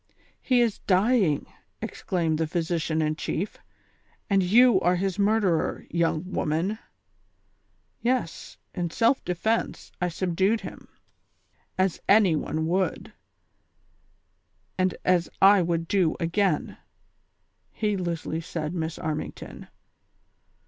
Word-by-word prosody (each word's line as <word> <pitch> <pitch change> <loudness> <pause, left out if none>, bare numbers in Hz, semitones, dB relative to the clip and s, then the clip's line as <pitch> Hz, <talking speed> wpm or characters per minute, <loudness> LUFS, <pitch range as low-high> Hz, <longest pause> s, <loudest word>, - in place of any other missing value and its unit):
"He 250 -2 +3
is 230 -4 0
dying," 195 - +3 0.3
exclaimed 165 -4 -2
the 160 - 0
physician 160 -1 -1
in 155 0 0
chief, 195 +5 -3 0.7
"and 195 -1 +4
you 220 +3 +5
are 180 +1 +3
his 190 +1 -2
murderer, 200 -5 +1
young 165 -1 0
woman." 175 +7 -1 0.6
" - - -43 0.5
Yes, 240 -8 -2 0.2
in 175 -3 -2
self 230 +9 +2
defence 220 +6 -2
I 180 - +1
subdued 190 +5 0
him, - - -9 0.9
as 185 -2 0
any 200 -5 +5
one 155 +1 -2
would, 185 +3 -1 1.6
and 185 0 0
as 180 -2 +2
I 195 0 +7
would 165 -1 -1
do 180 -4 +2
again," 175 -1 0 0.9
heedlessly 175 -6 -2
said 160 -1 -4
Miss 160 -2 -3
Armington. 155 -1 -5
180 Hz, 105 wpm, -26 LUFS, 165-200 Hz, 1.6 s, I